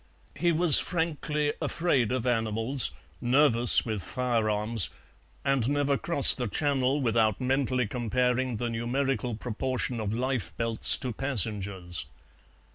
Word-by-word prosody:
He 175 0 0
was 165 -2 +8
frankly 150 -3 -3
afraid 140 -10 -1
of 130 -2 -3
animals, 115 +1 +1 0.3
nervous 120 -2 +5
with 110 -5 -4
firearms, 110 -4 0 0.6
and 135 -3 0
never 145 -1 0
crossed 140 -1 +5
the 125 -2 -3
Channel 140 +3 -1
without 110 -3 0
mentally 130 -1 -1
comparing 125 +2 -2
the 120 +1 -4
numerical 125 +1 -3
proportion 125 +2 -4
of 105 -2 -4
lifebelts 115 -2 -2
to 125 -3 -6
passengers. 100 -8 -4
125 Hz, 115 wpm, -26 LUFS, 115-135 Hz, 0.6 s, was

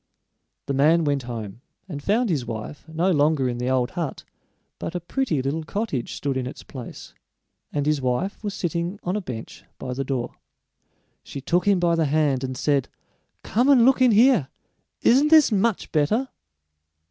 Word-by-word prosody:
The 140 - -2
man 155 +5 +4
went 145 -2 0
home 110 -2 -6 0.3
and 150 -6 -6
found 215 - +1
his 145 -6 0
wife 120 +7 -7
no 170 +4 +1
longer 145 -4 +2
in 120 -1 -3
the 125 +1 -1
old 130 -2 +1
hut, 170 -6 -4 0.6
but 165 - -5
a - - 0
pretty 175 - -1
little 150 +4 -2
cottage 165 - -3
stood 140 -2 -2
in 125 -1 -2
its 130 - -9
place, 125 -4 -10 0.6
and 145 -1 -1
his 150 -2 +1
wife 130 - -2
was 205 -2 -3
sitting 175 +3 -2
on 180 +2 -1
a 210 - -1
bench 120 - -8
by 125 - -5
the 135 +2 -2
door. 130 -3 -3 0.9
She 140 - -8
took 175 +7 0
him 200 -2 +4
by 175 -1 +2
the 165 -1 +2
hand, 145 -3 +1
and 130 -1 -4
said: 140 -1 +1 0.5
"Come 245 +6 +1
and 255 -5 +6
look 265 0 +4
in 255 - +6
here 225 - +5 0.6
isn't 270 +5 +5
this 310 -4 +6
much 215 0 0
better?" 210 - +1
155 Hz, 180 wpm, -24 LUFS, 135-200 Hz, 0.9 s, and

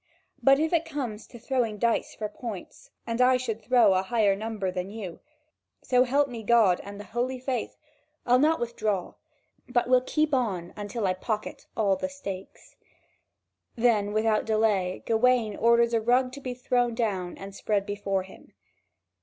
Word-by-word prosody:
But 275 0 +6
if 320 +2 0
it 335 -1 +3
comes 255 -10 -5
to 240 - -12
throwing 235 -3 -1
dice 230 +2 0
for 215 - -3
points, 210 -4 -8 0.2
and 230 +1 -1
I 255 0 +5
should 230 -3 -4
throw 230 -2 +4
a 185 - +2
higher 205 0 +2
number 210 -2 -3
than 180 +1 -4
you, 200 -5 -7 0.6
so 250 0 +3
help 280 +3 +2
me 240 -4 -7
God 220 -5 +4
and 200 0 -9
the - - -6
holy 240 +5 -2
faith, 255 -2 -3 0.5
I'll 250 +1 +4
not 315 +3 +3
withdraw, 215 -5 -2 0.6
but 245 -1 +1
will 255 0 +5
keep 305 +3 0
on 195 -10 -1
until 205 +1 -4
I 185 - +2
pocket 210 +3 -4
all 200 -3 +3
the 280 - -3
stakes." 200 -9 -9 1.0
Then 225 -4 +2
without 215 0 +2
delay 215 -4 +1
Gawain 230 -2 +2
orders 235 +1 +3
a 225 - +2
rug 250 +3 +2
to 280 +2 -9
be 255 -2 -5
thrown 245 -1 0
down 195 -7 -2
and 195 0 -9
spread 200 0 -1
before 200 -2 -2
him. 190 - -16
225 Hz, 170 wpm, -27 LUFS, 205-250 Hz, 1.0 s, But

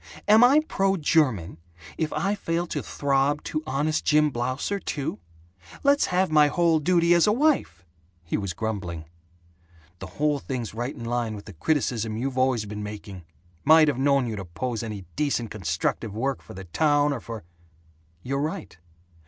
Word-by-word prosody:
"Am 215 +3 +7
I 275 +5 +6
pro 195 0 +1
German 130 - +1 0.4
if 160 -1 -2
I 195 +7 0
fail 170 -4 -2
to - - -3
throb 140 +1 0
to 155 - -3
Honest 150 +4 0
Jim 150 0 +3
Blausser, 130 +11 -2
too? 145 -2 -3 0.6
Let's 285 0 +4
have 185 -1 +1
my 150 -1 +6
whole 165 +1 +2
duty 170 +1 +3
as 170 +2 +4
a - - +5
wife!" 235 - +1 0.4
He 80 - -3
was 100 -4 -2
grumbling, 95 -6 -4 0.9
"The 95 - -7
whole 150 -1 +1
thing's 125 -6 -5
right 120 +4 -4
in 115 - -8
line 115 -2 -1
with 100 - -10
the 105 - -10
criticism 115 - -1
you've 130 +2 -2
always 130 -4 +2
been 105 0 -6
making. 105 -4 -8 0.4
Might 155 0 +6
have 135 -3 -2
known 140 -1 +3
you'd 110 -3 -4
oppose 105 +6 -4
any 105 -4 -6
decent 120 -5 -1
constructive 95 +3 -2
work 135 +4 -1
for - - -12
the 95 - -7
town 145 - +2
or 135 - -4
for 115 -3 -8 0.4
" 80 +1 -35
"You're 140 +2 -2
right. 145 - -4
130 Hz, 170 wpm, -25 LUFS, 105-155 Hz, 0.9 s, Am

